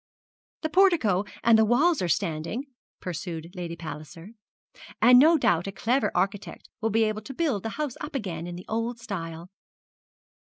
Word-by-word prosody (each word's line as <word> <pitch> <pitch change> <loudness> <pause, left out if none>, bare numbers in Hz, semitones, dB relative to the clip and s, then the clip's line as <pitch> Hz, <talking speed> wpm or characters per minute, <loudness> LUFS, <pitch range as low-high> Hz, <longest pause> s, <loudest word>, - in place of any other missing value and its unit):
'The 315 - 0
portico 320 - +4 0.2
and 230 -1 +6
the - - +6
walls 285 +9 +3
are 180 - 0
standing,' 170 - -1 0.4
pursued 170 -1 -5
Lady 170 -2 -5
Palliser; 165 +3 -9 0.7
'and 250 0 +7
no 320 +4 +6
doubt 175 - +1
a - - -3
clever 235 +8 0
architect 195 +3 -2
will 225 - +1
be 225 +1 +2
able 215 0 -1
to 255 +5 -9
build 285 - 0
the 225 - -4
house 295 -5 -3
up 295 -1 -6
again 175 -9 -4
in 175 - -6
the 180 - -9
old 230 +2 -2
style.' 170 -6 -6
210 Hz, 165 wpm, -26 LUFS, 175-250 Hz, 0.7 s, and